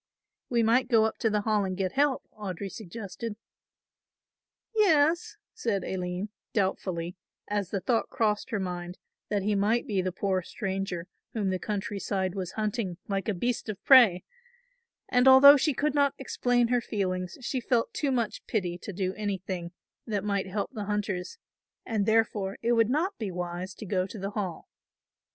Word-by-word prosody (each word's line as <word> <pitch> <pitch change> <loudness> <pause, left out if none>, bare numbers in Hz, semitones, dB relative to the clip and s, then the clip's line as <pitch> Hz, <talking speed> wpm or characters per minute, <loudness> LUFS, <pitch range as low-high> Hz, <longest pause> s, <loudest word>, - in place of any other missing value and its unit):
"We 235 -2 +2
might 240 +3 +3
go 225 -3 +4
up 220 - -2
to 225 - +2
the 210 -1 +1
Hall 210 -1 +1
and 185 -1 -3
get 190 -2 -1
help," 280 -1 +2
Audry 195 -2 -5
suggested. 210 +2 -6 1.4
"Yes," 335 -6 +3 0.2
said 205 -5 -1
Aline, 180 +2 -3 0.2
doubtfully, 185 -4 -1 0.3
as 205 -3 -1
the 195 - -2
thought 230 +5 +1
crossed 215 -4 0
her 215 - -1
mind 180 -1 -4 0.3
that 205 -2 0
he 210 +1 +1
might 210 +4 +2
be 200 -4 0
the 185 0 -2
poor 190 0 0
stranger 190 -1 -3 0.3
whom 205 -4 0
the 185 - -1
country 205 0 -3
side 190 -2 -1
was 190 -2 -4
hunting 210 -4 -2
like 195 +1 -1
a - - +1
beast 240 +4 -2
of 205 -1 -5
prey 235 -10 +7 0.8
and 250 +1 +3
although 270 +2 +10
she 290 0 +1
could 300 +3 +1
not 285 -1 +2
explain 245 -2 +1
her 245 -1 +2
feelings 185 -4 -2
she 255 +2 -2
felt 235 -1 +1
too 290 - 0
much 235 -4 -1
pity 180 -5 -1
to 205 - -7
do 185 0 -2
anything 190 -4 -4 0.4
that 205 -3 -1
might 200 -2 -1
help 200 +1 -3
the 215 -5 -5
hunters 200 -3 -2 0.5
and 215 -3 -1
therefore 220 -3 +1
it 235 - +2
would 230 -1 +4
not 340 +9 0
be 215 -4 -2
wise 180 +1 -5
to 215 - -8
go 185 -1 0
to 215 - -9
the 195 0 -4
Hall. 195 -6 -4
205 Hz, 175 wpm, -28 LUFS, 190-235 Hz, 1.4 s, although